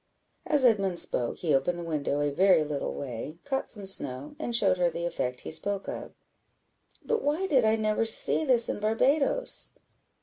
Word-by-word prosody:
As 290 -4 +2
Edmund 195 -7 +3
spoke, 120 -1 +3
he 160 -4 -2
opened 135 +6 0
the 175 - -7
window 145 -3 -3
a 145 0 -1
very 185 +1 +3
little 150 -2 -5
way, 135 +4 -8
caught 270 -1 -4
some 205 -4 -7
snow, 140 - +1
and 240 -6 -3
showed 195 -5 +2
her 175 -1 +1
the 170 +1 -6
effect 125 -7 -4
he - - -8
spoke 200 +5 -2
of. - - -8 0.9
"But 460 -1 -1
why 300 +6 -2
did 275 -9 +1
I 220 0 +2
never 215 0 -1
see 225 +7 +3
this 250 -5 +3
in - - -4
Barbadoes?" 275 - +2
195 Hz, 180 wpm, -26 LUFS, 155-240 Hz, 0.9 s, Edmund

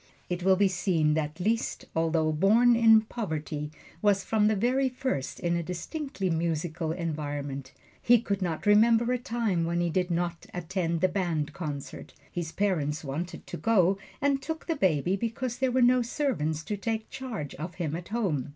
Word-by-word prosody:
It 180 0 -2
will 190 +1 +5
be 200 +1 +4
seen 175 -5 +1
that 155 +1 -2
Liszt, 225 +5 -1
although 160 -1 +2
born 220 +9 +5
in 225 -1 +7
poverty, 155 -9 -4 0.3
was 205 -2 +3
from 215 -2 +2
the 215 - +3
very 255 +6 +2
first 250 - -3
in 170 0 0
a 170 - 0
distinctly 190 - -4
musical 165 0 -1
environment. 145 -5 -4 0.3
He 240 0 +5
could 200 -3 -2
not 170 -4 -2
remember 225 +3 +5
a 250 - 0
time 225 -8 -1
when 170 +1 0
he 175 -1 0
did 180 +2 0
not 170 0 -2
attend 170 -1 -2
the 185 - +5
band 170 -5 -1
concerts 145 -5 -6 0.2
his 170 -2 -4
parents 160 -7 0
wanted 155 +5 -5
to - - -6
go, 195 0 +3 0.2
and 275 0 +2
took 320 +2 -5
the 330 - -1
baby 180 - +2
because 235 +3 -3
there 260 -1 +2
were 255 0 +3
no 250 +1 +5
servants 225 - -1
to 210 - -3
take 220 +1 -3
charge 225 - -5
of 165 +4 -6
him 160 -4 -2
at 175 +1 -6
home. 190 - -1
180 Hz, 180 wpm, -28 LUFS, 160-225 Hz, 0.3 s, in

